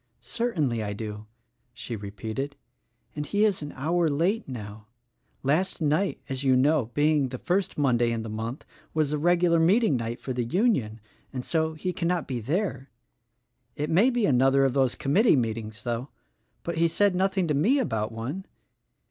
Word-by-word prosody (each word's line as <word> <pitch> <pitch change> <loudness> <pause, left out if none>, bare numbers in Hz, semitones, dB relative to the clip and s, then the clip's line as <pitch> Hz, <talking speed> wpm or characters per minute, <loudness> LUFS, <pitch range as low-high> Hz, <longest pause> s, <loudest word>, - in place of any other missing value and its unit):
"Certainly 160 - -1
I 105 -1 -3
do," 105 0 -6 0.5
she 120 -1 -5
repeated, 110 +7 -5 0.6
"and 150 - -2
he 205 +7 +2
is 205 -6 +1
an 145 -1 -6
hour 165 +5 +1
late 175 +10 0
now. 105 -3 -8 0.6
Last 160 +8 +1
night, 160 +5 +1
as 135 0 -4
you 130 -1 +4
know, 140 -1 +3
being 150 -2 +3
the 130 - -5
first 185 +6 -1
Monday 120 -5 +2
in 115 -1 -2
the - - -6
month, 110 +5 -5 0.3
was 155 -2 +1
the 150 - -1
regular 175 +1 +3
meeting 185 - +4
night 115 0 -4
for 130 - -4
the 125 -1 -1
Union; 120 - 0 0.3
and 125 -2 -5
so, 160 -1 0
he 180 +4 -3
cannot 175 -1 -1
be 125 -3 -3
there. 140 - -2 0.9
It 150 +1 -2
may 195 +10 +5
be 240 -4 +1
another 135 0 +4
of 135 - +1
those 130 -3 +2
committee 190 - +3
meetings, 110 -3 -3
though; 120 +3 -3 0.5
but 170 -1 -3
he 170 - +4
said 200 +4 +2
nothing 190 0 +1
to 150 - +1
me 205 - +3
about 110 - -1
one. 130 +12 -5
145 Hz, 175 wpm, -26 LUFS, 120-175 Hz, 0.9 s, may